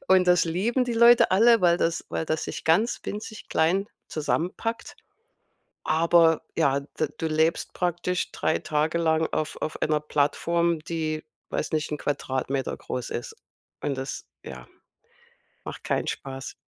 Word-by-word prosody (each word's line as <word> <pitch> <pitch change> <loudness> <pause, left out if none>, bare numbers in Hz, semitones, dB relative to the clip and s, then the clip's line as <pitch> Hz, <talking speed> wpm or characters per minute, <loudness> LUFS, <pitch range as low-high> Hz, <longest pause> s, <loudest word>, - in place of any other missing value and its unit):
Und 185 -1 +5
das 180 0 +5
lieben 210 +10 0
die 245 - -2
Leute 235 -1 +6
alle, 225 +2 +5
weil 175 0 +4
das 165 -1 0
weil 160 - -2
das 160 0 -1
sich - - -6
ganz 180 +9 +2
winzig 215 +1 -7
klein 185 +6 +1 0.2
zusammenpackt. 180 +9 -2 0.9
Aber, 165 0 +4
ja, 140 -3 +2
d 150 +1 -3
du 165 - -2
lebst 160 +1 +1
praktisch 180 0 -1
3 - - 0
Tage 155 +2 0
lang 160 -1 +2
auf 155 - -2
auf 155 - -3
einer 155 -1 +1
Plattform, 165 +3 +1
die 155 -1 -3 0.2
weiß - - -3
nicht, 155 -1 -1
'n 150 - -1
Quadratmeter 135 -2 -2
groß 125 - -5
ist? 120 - -5 0.5
Und 140 -2 -2
das, 135 +1 -5 0.2
ja, 65 -2 -9 1.0
macht - - -7
keinen - - -1
Spaß. 135 0 -5
160 Hz, 145 wpm, -26 LUFS, 150-180 Hz, 1.0 s, Leute